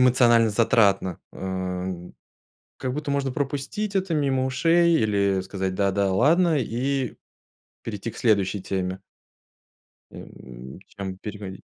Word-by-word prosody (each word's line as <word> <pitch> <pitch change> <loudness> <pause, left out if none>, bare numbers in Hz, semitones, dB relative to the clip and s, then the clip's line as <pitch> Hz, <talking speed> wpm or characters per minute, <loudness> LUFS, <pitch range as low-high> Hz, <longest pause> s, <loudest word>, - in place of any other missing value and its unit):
эмоционально 120 -3 +5
затратно, 105 -5 +2
а, 95 -1 -4 0.9
как 130 0 -3
будто 150 -1 -4
можно 140 -2 0
пропустить 145 +10 -3
это 185 -3 0
мимо 135 -3 +1
ушей 170 +5 +3
или 100 -5 +2
сказать 95 0 -3
"да, 100 0 +1
да, 100 0 +1
ладно" 160 - +3
и 130 +1 -1 0.7
перейти 110 +1 -5
к - - -13
следующей 100 -4 +1
теме. 95 0 -3 1.1
Эм, 65 +4 -11
чем 95 -2 -7
переходить 100 -2 -8
110 Hz, 115 wpm, -24 LUFS, 95-135 Hz, 1.1 s, эмоционально